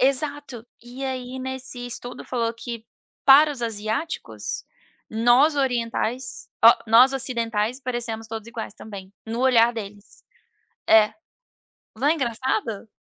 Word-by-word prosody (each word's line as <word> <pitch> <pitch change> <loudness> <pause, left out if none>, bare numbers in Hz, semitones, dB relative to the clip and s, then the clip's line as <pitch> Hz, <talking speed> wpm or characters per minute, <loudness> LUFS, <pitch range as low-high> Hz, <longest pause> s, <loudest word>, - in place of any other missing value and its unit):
Exato. 275 -2 -1 0.2
E 245 +3 -8
aí 260 -1 -4
nesse 260 -1 -6
estudo 245 0 -7
falou 230 -2 -1
que 230 -1 -7 0.4
para 290 +3 +8
os 270 -4 -6
asiáticos, 225 +7 -3 0.5
nós 240 +7 +4
orientais 250 -1 -2 0.2
ó, 230 - +10
nós 240 +4 +7
ocidentais 235 -2 -1
parecemos 235 -3 -4
todos 220 -1 -7
iguais 225 -3 -6
também, 200 -4 -10
no 230 +2 -3
olhar 240 -2 +5
deles. 205 -2 -9 0.7
É. 215 -1 +6 0.8
Não 255 +6 0
é 305 - +5
engraçado? 235 -5 -2
240 Hz, 120 wpm, -24 LUFS, 225-260 Hz, 0.8 s, ó